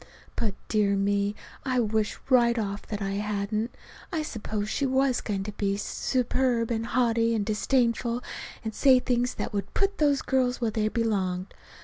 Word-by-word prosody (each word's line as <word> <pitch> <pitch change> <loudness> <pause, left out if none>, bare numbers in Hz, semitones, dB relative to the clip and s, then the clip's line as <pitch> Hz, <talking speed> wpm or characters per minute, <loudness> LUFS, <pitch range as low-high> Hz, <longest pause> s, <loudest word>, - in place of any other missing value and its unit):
But, 210 -4 -1
dear 205 -2 +2
me, 200 +1 +1 0.3
I 255 -2 +1
wished 220 -2 0
right 240 -2 +5
off 200 -2 -3
that 210 -2 -3
I 195 - -1
hadn't. 210 +2 -2 0.4
I 320 -4 -1
supposed 215 -6 -3
she 280 - +1
was 265 -1 +2
going 200 -3 -2
to 210 - -5
be 200 -1 -1
superb 245 +1 0
and 225 0 -1
haughty 230 -1 +2
and 210 -2 0
disdainful, 235 +2 +1 0.4
and 220 -1 -3
say 265 +1 +6
things 245 0 0
that - - -4
would 200 -2 -3
put 395 0 +1
those 285 -3 +3
girls 255 -1 +1
where 230 -2 0
they 215 0 0
belonged. 200 -5 -1
225 Hz, 165 wpm, -27 LUFS, 205-250 Hz, 0.4 s, say